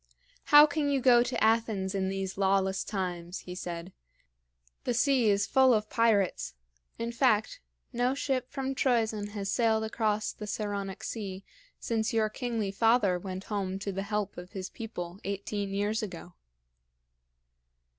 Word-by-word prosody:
"How 295 0 +9
can 295 -1 -1
you 280 -1 +2
go 245 -2 +6
to 245 -1 -1
Athens 220 -4 +1
in 190 -1 0
these 190 -1 -3
lawless 190 0 +1
times?" 180 -3 -4
he 180 - -8
said. 175 0 -6 0.9
"The 245 - -1
sea 250 -2 +3
is 200 0 +2
full 260 -2 +5
of 215 0 -2
pirates. 205 - +1 0.4
In 230 0 -3
fact, 235 -3 +2 0.3
no 245 +2 +1
ship 260 -3 -1
from 270 -1 -3
Troezen 225 -5 +1
has 200 -2 -3
sailed 225 -1 +2
across 215 -1 0
the 210 - -8
Saronic 200 -2 -4
Sea 195 -4 -5 0.4
since 225 -1 -1
your 220 -1 +2
kingly 225 -3 -2
father 210 -3 +3
went 185 +1 -6
home 195 -3 -3
to 200 +1 -4
the 195 +1 -3
help 205 -1 -3
of 180 +3 -11
his 190 -2 -5
people, 185 -5 -7
eighteen 200 +1 -3
years 205 +2 -1
ago." 180 -4 -7
210 Hz, 150 wpm, -29 LUFS, 195-230 Hz, 0.9 s, How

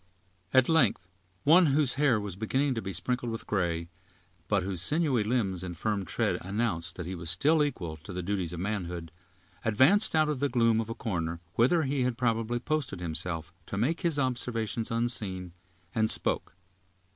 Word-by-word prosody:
At 130 -1 +5
length 125 - +2 0.4
one 170 +4 +6
whose 140 -2 +3
hair 135 -5 +3
was 100 -3 -5
beginning 130 +7 0
to 115 - -3
be 95 - -4
sprinkled 120 +7 -1
with 115 - -5
gray, 85 -4 -1 0.6
but 100 -3 +1
whose 95 -3 -2
sinewy 145 - +2
limbs 105 -6 0
and 90 -2 -6
firm 105 0 -1
tread - - 0
announced 95 -5 -2
that 90 - -6
he 90 - -4
was 85 -2 -5
still 150 - +3
equal 85 - -3
to 80 +6 -10
the 90 0 -4
duties 95 -3 -2
of 85 - -6
manhood, 90 -5 -4 0.5
advanced 130 - +4
out 155 -1 +4
of 150 -3 -1
the 145 +1 +1
gloom 115 -2 +3
of 115 - -6
a 115 - -4
corner, 85 -6 -3
whither 135 - +3
he 140 -1 0
had 125 -2 0
probably 115 -1 0
posted 145 - -2
himself 85 -1 -3
to 100 - -4
make 135 +11 0
his 170 -5 +2
observations 120 -4 -1
unseen, 105 -7 -1 0.4
and 110 -1 +2
spoke. - - -1
110 Hz, 180 wpm, -29 LUFS, 90-130 Hz, 0.6 s, one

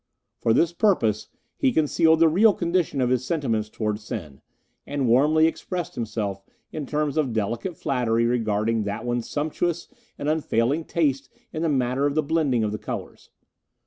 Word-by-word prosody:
For 115 - +1
this 165 +8 +3
purpose 115 - +1 0.3
he 270 - +3
concealed 160 - +3
the 165 - +7
real 200 +7 +5
condition 170 -5 0
of 125 0 +1
his 130 -1 +1
sentiments 120 -9 -1
towards 105 -1 -3
Sen, 80 -11 -7 0.5
and 140 -3 -1
warmly 150 +7 +4
expressed 175 +1 -3
himself 105 -4 -3 0.3
in 150 -3 -5
terms 150 +1 -1
of 140 -6 +1
delicate 115 - -2
flattery 115 -3 0
regarding 110 -2 0
that 100 +3 -4
one's 120 -1 -2
sumptuous 160 +3 -2 0.3
and - - -4
unfailing 150 -1 +1
taste 140 -5 0 0.2
in 155 - -3
the 165 - +1
matter 130 0 +1
of 145 - -2
the 155 - +2
blending 140 -6 +1
of 105 - -1
the 105 - -4
colours. - - -7
135 Hz, 165 wpm, -24 LUFS, 115-160 Hz, 0.5 s, the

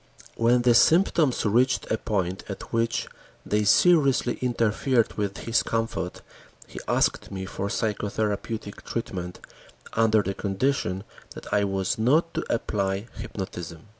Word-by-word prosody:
When 120 +1 +3
the 120 -1 +5
symptoms 160 0 +4
reached 125 +5 +2
a 110 - +2
point 95 -3 -2
at 100 - -7
which 115 0 0 0.4
they 105 0 +1
seriously 140 - +4
interfered 120 0 +1
with 100 -2 -2
his 115 0 +2
comfort, 115 0 -3 0.4
he - - -9
asked - - +1
me 95 -1 -5
for 95 +1 -4
psychotherapeutic 105 0 -2
treatment, 90 -6 -5 0.5
under 110 -2 +3
the 95 - -2
condition 95 -1 -1 0.3
that - - -8
I 105 0 +3
was 95 +1 -1
not 155 +9 +3
to - - -2
apply 100 -1 -1
hypnotism. 90 -2 -7
110 Hz, 130 wpm, -26 LUFS, 100-120 Hz, 0.5 s, the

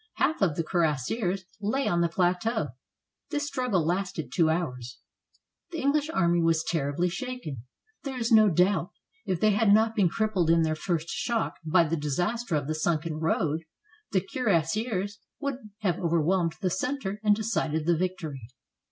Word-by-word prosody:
Half 315 - +1
of 175 -7 +2
the 165 - -1
cuirassiers 175 - 0 0.2
lay 265 +7 0
on 170 0 +2
the 170 - +2
plateau. 180 - 0 0.6
This 290 -1 -1
struggle 250 - 0
lasted 180 -2 -2
two 165 -3 +3
hours. 125 -7 -2 0.7
The 340 - -6
EngHsh 290 +2 +2
army 175 - +2
was 165 -1 +2
terribly 160 +2 0
shaken. 185 - -5 0.4
There 270 -2 -5
is 235 0 -1
no 215 -2 +7
doubt, 180 +1 +2 0.4
if 185 -3 0
they 215 +2 +4
had 205 0 +3
not 220 +2 +4
been 195 -6 +3
crippled 205 -5 0
in 165 0 +5
their 160 -1 +1
first 165 0 -2
shock 235 -2 -1
by 170 +2 +4
the 165 +1 -1
disaster 175 - -1
of 145 -2 0
the 155 - -1
sunken 155 0 -1
road, 160 -1 0 0.5
the 190 - +2
cuirassiers 205 - -1 0.2
would 270 -6 -4
have 185 -5 0
overwhelmed 170 0 +1
the 185 -3 0
center 210 -1 -2
and 210 -1 +5
decided 160 -8 -1
the 170 0 +3
victory. 170 -5 -3
180 Hz, 160 wpm, -27 LUFS, 160-215 Hz, 0.7 s, no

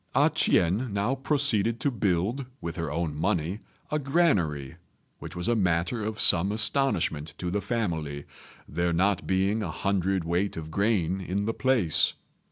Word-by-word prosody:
A - - +4
ch'ien 105 +8 +1
now 100 +5 0
proceeded 130 -6 0
to 140 - +1
build, 105 +4 -1
with 85 -1 -5
her 80 -4 -4
own 80 -1 -2
money, 90 +3 -1 0.3
a 150 - +1
granary, 100 - 0 0.4
which - - -9
was 90 +3 -3
a 120 - +2
matter 95 +3 0
of 110 0 -4
some 90 +4 +6
astonishment 105 - +1
to 90 -1 -4
the 100 +2 -1
family, 80 - -3 0.4
there 85 0 -1
not 95 +2 +1
being 95 +4 +1
a 95 - -3
hundredweight 95 0 -1
of 80 -1 -7
grain 95 -2 0
in 95 +3 -2
the 115 - -1
place. 120 - +2
95 Hz, 155 wpm, -27 LUFS, 85-115 Hz, 0.4 s, some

